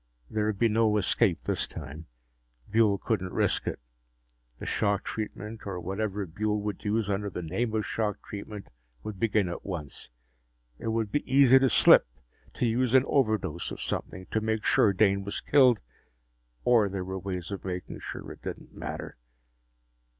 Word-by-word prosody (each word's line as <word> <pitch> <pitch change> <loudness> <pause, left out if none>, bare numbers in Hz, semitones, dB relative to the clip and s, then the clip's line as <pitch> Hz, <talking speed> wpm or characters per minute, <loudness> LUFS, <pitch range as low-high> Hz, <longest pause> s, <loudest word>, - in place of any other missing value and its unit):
There 105 -1 0
would 105 -2 -1
be 115 - +4
no 110 -1 +3
escape 100 -1 +2
this - - -1
time. 80 +1 -9 0.6
Buehl 110 -2 +3
couldn't 95 -4 -2
risk - - +1
it. - - -2 0.8
The - - -8
shock 100 -1 0
treatment 110 0 -6
or 95 -3 -3
whatever 100 +2 -2
Buehl 105 +5 -1
would 105 0 -4
use 110 0 0
under 100 0 -1
the 90 -2 -5
name 110 +7 -1
of 110 - 0
shock 105 -2 -1
treatment 100 -4 -7 0.3
would 105 -3 -6
begin 105 -4 +2
at 85 - -5
once. 85 -7 -6 0.7
It - - -5
would 110 -2 -1
be 145 -1 -2
easy 135 -1 +7
to 135 0 +3
slip, 105 - +7 0.5
to - - 0
use 120 +2 +2
an 130 - +7
overdose 110 - 0
of - - -7
something, 95 0 -3
to 110 - +1
make 110 0 -1
sure 105 - +4
Dane 100 0 +2
was 100 - -3
killed. 130 - +4 0.8
Or 115 -5 +4
there 95 -1 -4
were 95 +1 -4
ways 90 -2 -5
of 100 - -5
making 90 -1 -5
sure - - -7
it - - -12
didn't - - -7
matter. - - -6
105 Hz, 170 wpm, -28 LUFS, 95-110 Hz, 0.8 s, easy